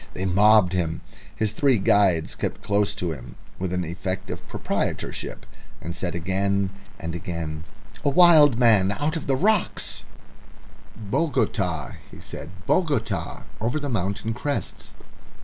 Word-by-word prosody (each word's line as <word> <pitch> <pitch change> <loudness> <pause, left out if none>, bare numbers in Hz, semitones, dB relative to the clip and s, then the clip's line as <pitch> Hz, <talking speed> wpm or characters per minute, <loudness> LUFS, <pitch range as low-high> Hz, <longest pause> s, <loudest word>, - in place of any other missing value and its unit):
They 95 - -2
mobbed 100 0 +5
him. 80 -3 -1 0.3
His 110 -2 0
three 135 -1 +3
guides 95 -4 +3
kept - - -4
close 100 0 +1
to 90 -3 -2
him 60 -5 -9 0.2
with 95 -1 -2
an 90 0 -1
effect 90 +3 -4
of - - -7
proprietorship, - - -3 0.3
and 85 +2 -6
said 90 0 -3
again 95 +2 0 0.3
and 85 0 -5
again, 85 -3 -5 0.4
"A 145 - +3
wild 150 -4 +7
man 110 -6 +5
out 150 +8 -1
of 160 - -4
the 135 - +2
rock." 205 +7 +2 1.2
"Bogota," 100 - -1 0.2
he - - -12
said. 75 - -8 0.2
"Bogota. 115 - 0 0.2
Over 120 +7 0
the 145 -1 -4
mountain 100 0 -1
crests." 140 +5 -4
100 Hz, 135 wpm, -24 LUFS, 90-125 Hz, 1.2 s, wild